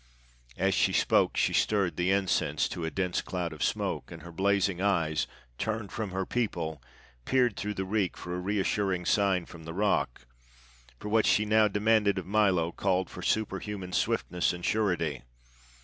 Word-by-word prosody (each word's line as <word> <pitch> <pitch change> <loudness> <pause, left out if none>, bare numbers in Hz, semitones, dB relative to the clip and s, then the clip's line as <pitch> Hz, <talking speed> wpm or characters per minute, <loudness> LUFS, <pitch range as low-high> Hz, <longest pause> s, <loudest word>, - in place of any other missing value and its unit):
As - - +2
she - - +2
spoke - - +3
she - - +2
stirred 100 -4 +1
the 90 +1 0
incense 95 -1 +1
to 85 - -5
a - - -1
dense 90 0 -1
cloud 90 -3 -4
of 75 - -11
smoke, - - -2
and - - -9
her 85 - -9
blazing 95 0 +1
eyes, 85 -7 +1 0.3
turned 110 -2 -2
from 110 -5 -3
her 95 +1 -2
people, 85 - -2 0.4
peered 125 - +2
through 105 +1 -3
the 95 - -2
reek 100 -2 -1
for 90 - -6
a - - -3
reassuring 95 -1 0
sign 95 -3 +2
from 85 -1 -12
the 80 +1 -7
rock, 95 -11 0 0.7
for 105 - -6
what 110 0 +3
she 105 - +3
now 110 0 +4
demanded 105 0 +2
of 95 - -3
Milo 95 -5 +2
called 95 -1 0
for - - -8
superhuman 100 -3 -2
swiftness 90 0 0
and 90 0 -6
surety. 90 - 0
95 Hz, 170 wpm, -29 LUFS, 90-105 Hz, 0.7 s, now